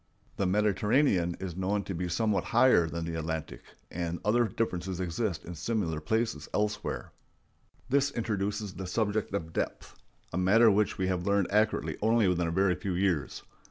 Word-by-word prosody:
The 100 - +1
Mediterranean 105 - +2
is 90 -3 -5
known 100 +2 -1
to 95 - -5
be 90 +1 -3
somewhat 105 +2 0
higher 120 -8 +4
than 85 +1 -4
the 80 0 -3
Atlantic, 80 -1 -4 0.3
and 85 0 -3
other 115 +3 +3
differences 95 -4 -3
exist 90 +1 -2
in 85 - -6
similar 85 -3 -2
places 110 +7 -1
elsewhere. 105 0 -2 0.8
This 140 +2 +2
introduces 105 -4 -2
the 95 - -6
subject 105 +2 -1
of 80 -4 -4
depth—a - - -6
matter 110 +5 +5
which 105 0 +1
we 95 - 0
have 95 -1 -1
learned 100 -2 +2
accurately 105 +2 +1
only 110 -1 +3
within 90 -1 +1
a - - -1
very 95 +1 +3
few 95 0 -3
years. 90 -5 0
95 Hz, 160 wpm, -29 LUFS, 85-110 Hz, 0.8 s, matter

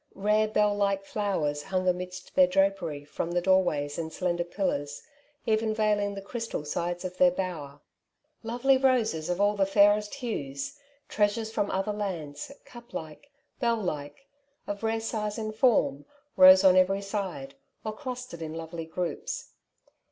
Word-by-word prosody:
Rare 210 +2 +2
bell 210 -1 +2
like 200 -1 0
flowers 175 -9 -1
hung 185 +2 -2
amidst 180 +1 -3
their 185 -1 +6
drapery 190 -6 0
from 165 - -4
the 175 - +2
doorways 175 -6 +1
and 160 -1 -4
slender 175 0 -1
pillars, 170 -5 -3 0.4
even 220 0 +1
veiling 205 -2 +1
the 195 - -7
crystal 225 -7 -4
sides 175 +4 -3
of 180 0 -5
their 180 - +6
bower. 165 -6 -5 0.6
Lovely 245 +4 +2
roses 240 -12 +1
of 180 +1 -1
all 205 +1 +3
the 200 - +2
fairest 205 +2 +4
hues 210 - -4
— 285 0 -39
treasures 220 +1 0
from 205 -2 -1
other 195 +2 -1
lands, 170 - -5
cup 240 0 -13
like, 160 - -7 0.3
bell 235 -2 +2
like, 165 - -5 0.4
of 205 0 -5
rare 225 0 0
size 215 -1 -3
and 215 -1 -3
form 215 - +2 0.2
— - - -42
rose 185 0 +9
on 185 -1 +7
every 195 +2 +3
side, 190 -10 -4 0.3
or 215 - -2
clustered 250 - -7
in 160 0 -5
lovely 165 0 -6
groups. 180 - -4
195 Hz, 160 wpm, -28 LUFS, 170-215 Hz, 0.6 s, rose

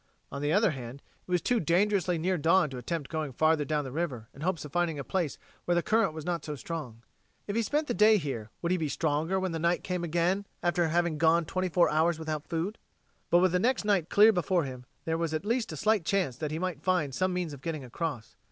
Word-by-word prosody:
On 140 - -5
the 145 +1 0
other 205 +1 +4
hand, 130 -1 -8 0.2
it - - -19
was 180 -2 +1
too 245 -2 +2
dangerously 180 +1 +2
near 180 +4 0
dawn 165 -1 +3
to 130 - -5
attempt 150 +3 -3
going 155 -3 -2
farther 155 +3 +2
down 150 0 -1
the 130 - -6
river 130 -8 -3
in 140 - -13
hopes 170 -1 -1
of 150 - -9
finding 175 -2 0
a 140 - -4
place 165 +2 -2 0.3
where 175 - +2
the 175 - +2
current 225 -6 +2
was 155 -1 -8
not 170 -3 -2
so 150 - -4
strong. 130 -5 -6 0.4
If 200 - -4
he 230 - +2
spent 295 +7 0
the 245 - -2
day 215 0 +6
here 135 - -4
would 170 - 0
he 185 - +2
be 155 -2 -1
stronger 160 +6 0
when 190 -1 -2
night 170 +2 0
came 180 -2 -2
again 175 +4 0 0.2
after 175 -1 +2
having 170 -1 0
gone 165 +1 +4
twenty 185 +3 -2
four 175 0 +4
hours 160 +2 +2
without 155 -2 -4
food? 170 +6 -3 0.5
But 175 - +5
with 185 -1 +4
the 180 - +2
next 245 +2 +1
night 195 -6 +2
clear 215 +2 +6
before 180 -1 +1
him, 125 -2 -7 0.2
there 160 0 -1
was 165 -2 -1
at 155 - -3
least 230 -1 0
a 155 - -6
slight 215 +2 +2
chance 180 -8 0
that 155 +1 -3
he 155 - -3
might 175 -4 -3
find 165 -6 +1
some 185 +7 0
means 180 -4 -2
of 140 - -10
getting 155 -2 -4
across. 130 -1 -5
165 Hz, 245 wpm, -29 LUFS, 150-185 Hz, 0.5 s, day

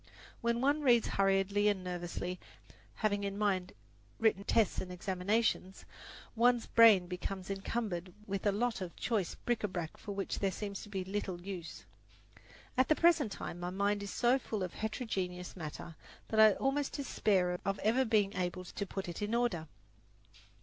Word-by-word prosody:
When 235 0 +1
one 285 +3 +2
reads 240 -5 +4
hurriedly 195 +1 +2
and 200 -3 +1
nervously, 180 0 -4 0.6
having 205 -2 0
in 200 0 -3
mind 195 -3 0 0.5
written 215 -3 +2
tests 220 0 +2
and 180 - -6
examinations, 190 +2 -1 0.5
one's 240 0 +4
brain 220 -6 +7
becomes 185 +1 -5
encumbered 195 -3 -3
with 195 0 -2
a - - +5
lot 230 +2 -1
of 180 -2 -5
choice 210 -8 -1
bric 240 -2 -2
a - - +2
brac 175 -4 -5
for 205 - -6
which 195 0 -3
there 195 - +1
seems 200 0 -5
to 210 - -10
be 190 -2 -3
little 190 -2 -3
use. 180 -2 -7 0.9
At 260 - +5
the 310 - +4
present 330 -9 +4
time 175 - -6
my 175 0 -3
mind 200 +2 0
is 200 - -5
so 245 +5 +3
full 215 -5 -3
of 180 - -4
heterogeneous 190 -5 -3
matter 165 0 -7 0.3
that 220 - +1
I 215 -1 +8
almost 270 +4 -1
despair 190 -10 +1
of 195 0 -1
ever 235 +5 +3
being 210 -4 +2
able 180 0 -2
to 200 - -4
put 195 0 -5
it 175 +2 -6
in 210 +3 0
order. 200 -10 0
200 Hz, 170 wpm, -33 LUFS, 185-225 Hz, 0.9 s, I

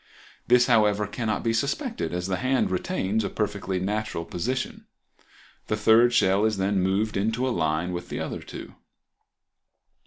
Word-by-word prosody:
This, 125 0 +5
however, 105 -4 +3
cannot 110 +1 -2
be 115 - +1
suspected, 225 - -2
as 90 0 -3
the 95 -1 -1
hand 130 -3 +1
retains 105 - -1
a - - -2
perfectly 100 -3 -2
natural 105 -3 -2
position. 125 +12 -4 0.8
The 110 - 0
third 115 +3 +5
shell 95 -3 +3
is 110 -2 +1
then 95 0 +1
moved 100 +4 0
into 110 +6 0
a - - 0
line 80 +1 0
with 90 0 -6
the - - -4
other - - -4
two. - - -9
105 Hz, 155 wpm, -25 LUFS, 95-115 Hz, 0.8 s, This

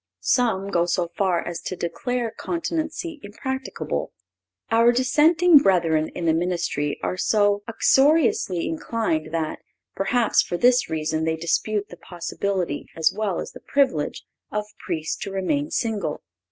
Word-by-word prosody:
Some 200 -6 +1
go 170 -1 +2
so 170 0 0
far 185 -4 0
as 175 -1 -4
to 185 - -4
declare 230 +8 -2
continency 325 0 -3
impracticable. 265 +6 -4 0.6
Our 230 +1 +5
dissenting 305 +6 +5
brethren 165 - +2
in 175 - -3
the 160 - +4
ministry 170 -4 -1
are 185 - -1
so 205 +1 +2
uxoriously 265 - +3
inclined 165 -2 -2
that, 160 -2 -2 0.4
perhaps, 225 +4 +2
for 175 - -3
this 245 +4 +4
reason 155 0 -1
they 160 0 +1
dispute 200 +6 -1
the 175 - -11
possibility, 175 -2 -3
as 160 -1 +3
well 210 -4 -1
as - - -5
the - - -11
privilege, 265 - 0 0.3
of 210 0 -2 0.2
Priests 160 -4 -2
to - - -5
remain 285 +11 -1
single. 210 - -2
200 Hz, 140 wpm, -23 LUFS, 170-245 Hz, 0.6 s, Our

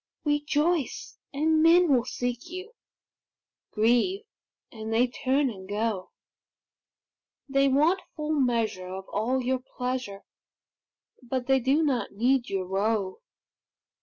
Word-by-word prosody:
Rejoice, 295 +1 0
and 310 +2 +2
men 340 +2 +6
will 245 -3 +3
seek 245 +5 -4
you; 370 +6 -8 1.0
Grieve, 245 - +2 0.5
and 220 -1 -6
they 230 +3 +4
turn 260 +2 0
and 190 -2 -11
go; 210 -2 -2 1.4
They 275 0 +3
want 310 +8 +3
full 305 -1 -3
measure 230 -9 0
of 190 +1 -7
all 250 +5 0
your 260 +1 0
pleasure, 250 -5 -5 1.0
But 250 0 -3
they 265 +1 +3
do 270 +6 +2
not 255 -8 -1
need 245 +4 +1
your 190 -1 -2
woe. 195 - -1
255 Hz, 115 wpm, -27 LUFS, 220-295 Hz, 1.4 s, men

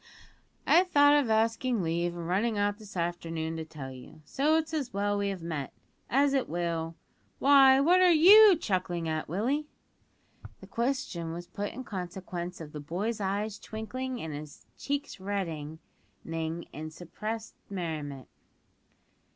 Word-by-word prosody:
"I 355 - +6
thought 290 -5 +5
of 290 -5 +3
asking 225 0 +1
leave 170 +1 -1
and 170 -1 -5
running 210 +5 +1
out 205 +1 0
this 205 -3 -10
afternoon 165 -1 -2
to 160 - -3
tell 150 -4 -8
you, 140 +4 -13
so 295 +4 +2
it's 320 0 -1
as 290 -5 -2
well 205 +1 0
we 200 0 0
have 190 -4 -5
met, 155 -5 -4 0.4
as 275 +2 +3
it 270 -2 0
will 165 -1 -2 0.4
Why, 270 -1 +7
what 345 +6 +5
are 365 - +6
you 390 +5 +9
chuckling 180 - -2
at, 155 -1 -2
Willie?" 255 - -1 0.9
This - - -14
question 235 - -2
was 175 +1 -6
put 205 +3 -5
in 260 - -7
consequence 180 -3 -6
of 155 -3 -8
the 150 - -7
boy's 200 +10 -3
eyes 200 +2 -2
twinkling 250 +4 -5
and 160 -2 -5
his 145 0 -9
cheeks 285 -4 -4
reddening 165 -6 -4 0.5
with 160 -1 -5
suppressed 215 +7 -6 0.2
merriment. 155 -8 -5
195 Hz, 150 wpm, -29 LUFS, 165-255 Hz, 0.9 s, you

